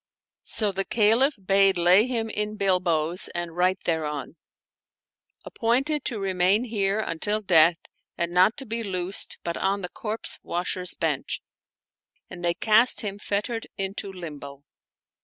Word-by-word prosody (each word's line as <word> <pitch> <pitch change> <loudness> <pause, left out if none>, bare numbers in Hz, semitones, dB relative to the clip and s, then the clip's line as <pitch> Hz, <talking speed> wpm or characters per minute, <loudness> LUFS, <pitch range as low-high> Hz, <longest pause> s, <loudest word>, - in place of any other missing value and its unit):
So 215 -3 +2
the 195 0 -1
Caliph 230 +8 +2
bade 195 -1 +4
lay 180 +6 +5
him 230 -3 -2
in 210 0 -3
bilboes 180 -4 +1
and 175 -1 -4
write 185 +1 +1
thereon, 155 -2 -3 0.6
" - - -42
Appointed 270 +6 0
to 230 -4 -2
remain 190 +2 +2
here 205 -3 -1
until 210 +2 -2
death, 170 -4 +4 0.4
and 170 0 -2
not 185 +5 +3
to 270 - -7
be 230 0 -3
loosed 190 -2 0
but 170 - -4
on 195 +1 -1
the 180 - -5
corpse 220 +3 -1
washer's 180 +1 -1
bench 155 -5 -2 0.4
"; - - -50
and 175 - -9
they 170 0 +1
cast 225 +3 +4
him 205 -2 -5
fettered 210 +3 -3
into 195 +1 -4
limbo. 145 -6 -9
195 Hz, 145 wpm, -25 LUFS, 175-215 Hz, 0.6 s, lay